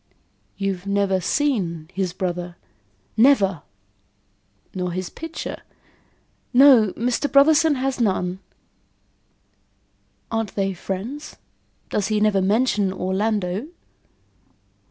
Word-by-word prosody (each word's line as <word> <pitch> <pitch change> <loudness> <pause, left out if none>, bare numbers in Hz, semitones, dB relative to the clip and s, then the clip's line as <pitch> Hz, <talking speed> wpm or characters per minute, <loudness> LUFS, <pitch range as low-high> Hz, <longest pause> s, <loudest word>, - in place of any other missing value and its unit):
"You've 195 -1 -3
never 200 -1 +1
seen 180 - -1
his 190 -2 -1
brother?" 180 -2 -4 0.6
"Never." 210 - +4 1.1
"Nor 180 -2 -3
his 185 0 -4
picture?" 325 0 -7 0.9
"No, 250 -6 +7
Mr. 250 +5 -1
Brotherson 305 +2 +5
has 265 -1 -2
none." 185 -3 0 1.9
"Aren't 225 -3 -2
they 195 -1 0
friends? 200 - -6 0.6
Does 205 - 0
he 215 -1 +1
never 210 -2 +2
mention 205 0 +1
Orlando?" 190 +3 -1
200 Hz, 90 wpm, -22 LUFS, 185-250 Hz, 1.9 s, No